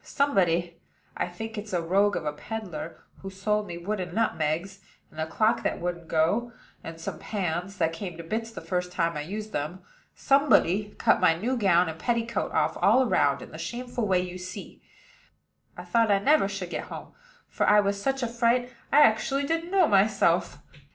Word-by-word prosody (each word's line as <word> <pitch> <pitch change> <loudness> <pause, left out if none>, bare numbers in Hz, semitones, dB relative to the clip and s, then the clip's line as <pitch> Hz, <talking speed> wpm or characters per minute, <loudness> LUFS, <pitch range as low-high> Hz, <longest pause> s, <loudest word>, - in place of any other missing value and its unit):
Somebody 175 -11 +1 0.4
I - - -1
think 220 +5 -6
it's 210 -1 -8
a 175 - +1
rogue 200 +4 +2
of - - -3
a 150 - -1
peddler 175 -2 -7 0.2
who 195 - -7
sold 210 +2 -1
me 170 - -6
wooden 180 0 -4
nutmegs, 190 -3 -1 0.3
and 155 - -6
a 160 - -2
clock 215 +7 +1
that - - -2
wouldn't 175 -1 -4
go, 170 +10 +1 0.3
and 165 0 -8
some - - -6
pans 185 -1 -3
that 165 -1 +1
came 175 0 -6
to 170 - -7
bits 225 +7 -3
the 225 - -9
first 180 -1 -2
time 165 -2 0
I 150 - -3
used 210 +7 -6
them 155 +4 -4 0.3
somebody 215 - +3
cut - - +3
my 165 - +5
new 235 +10 -1
gown 180 -6 +3
and 160 0 -6
petticoat 235 -1 -1
off - - 0
all 260 - +5
round, - - +2
in - - -12
the - - -9
shameful 245 -2 -4
way 185 -2 +3
you 180 0 -5
see. 185 +2 -9 1.0
I - - -7
thought 230 -2 +2
I 200 - +5
never 275 +2 +3
should 195 -3 -5
get - - -4
home; - - -9 0.3
for - - -1
I 210 0 +6
was 200 0 0
such 270 +2 -1
a - - +1
fright, 240 +1 +1 0.2
I 295 - +6
actually 270 +4 +3
didn't 330 +4 -2
know 375 -3 +4
myself. 195 - +2
195 Hz, 190 wpm, -27 LUFS, 175-230 Hz, 1.0 s, I